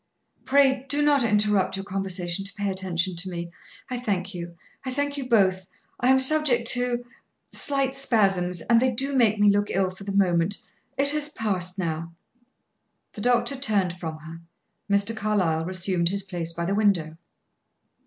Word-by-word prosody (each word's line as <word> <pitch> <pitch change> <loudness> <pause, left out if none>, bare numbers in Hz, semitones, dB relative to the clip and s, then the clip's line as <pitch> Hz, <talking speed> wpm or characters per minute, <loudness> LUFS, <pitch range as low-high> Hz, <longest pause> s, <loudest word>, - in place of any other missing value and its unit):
"Pray 265 -1 +3
do 290 +1 +2
not 290 -2 +3
interrupt 210 -3 +2
your 195 0 -6
conversation 190 -2 -2
to 195 0 -5
pay 205 -1 -2
attention 185 -1 -1
to 180 +3 +1
me! 170 -1 -6 0.4
I 250 -1 -4
thank 200 -5 -2
you; 170 -1 -7 0.3
I 260 - -4
thank 285 +2 -2
you 270 -3 -5
both. 190 -5 +2 0.3
I 245 - +1
am 265 +1 +6
subject 265 -3 +3
to 245 -1 0 0.5
slight 275 -2 0
spasms, 195 -9 +1
and 230 +4 +3
they 260 - +3
do 270 +3 -2
make 225 -4 +3
me 205 0 +5
look 205 +1 0
ill 190 0 0
for 190 +2 -12
the 200 - -5
moment. 185 -1 +1 0.4
It 280 +1 +4
has 300 0 0
passed 195 -8 -1
now." 165 -2 -3 1.0
The 210 - -8
doctor 245 +4 +2
turned 200 -9 -1
from 160 -2 -5
her; 160 +2 -11 0.5
Mr. 200 +3 +1
Carlyle 190 -7 0
resumed 180 -1 0
his 200 +1 -1
place 175 -4 -4
by 170 +1 -4
the 195 - -1
window. 185 -7 +1
200 Hz, 170 wpm, -25 LUFS, 180-245 Hz, 1.0 s, am